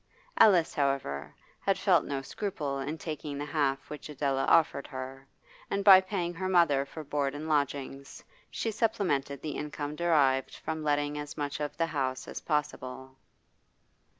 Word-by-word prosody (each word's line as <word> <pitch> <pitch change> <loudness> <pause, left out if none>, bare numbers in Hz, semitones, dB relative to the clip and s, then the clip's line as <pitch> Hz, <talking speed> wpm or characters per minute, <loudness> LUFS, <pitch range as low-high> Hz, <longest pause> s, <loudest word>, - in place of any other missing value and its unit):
Alice, 180 -6 +6
however, 130 - -1 0.3
had - - +1
felt - - +4
no 135 -1 -3
scruple 145 -6 -3
in 150 +4 -3
taking 155 -3 -5
the 145 - -3
half 140 -2 0
which 150 0 -8
Adela 140 -2 0
offered 150 -4 +3
her, 135 0 -7 0.4
and 200 0 -1
by 190 -2 +10
paying 185 -2 -2
her 185 +2 -3
mother 165 -7 +4
for 155 - -8
board 140 -1 -1
and 155 +2 -5
lodgings 140 -2 -2 0.3
she 225 - -2
supplemented 145 - 0
the 155 - -3
income 150 0 -4
derived 145 -6 +2
from 160 0 -4
letting 145 0 0
as 145 0 -7
much 145 +1 -3
of 145 -1 -4
the 165 - +2
house 135 -5 -2
as - - -5
possible. 130 -3 -3
145 Hz, 155 wpm, -30 LUFS, 135-160 Hz, 0.4 s, by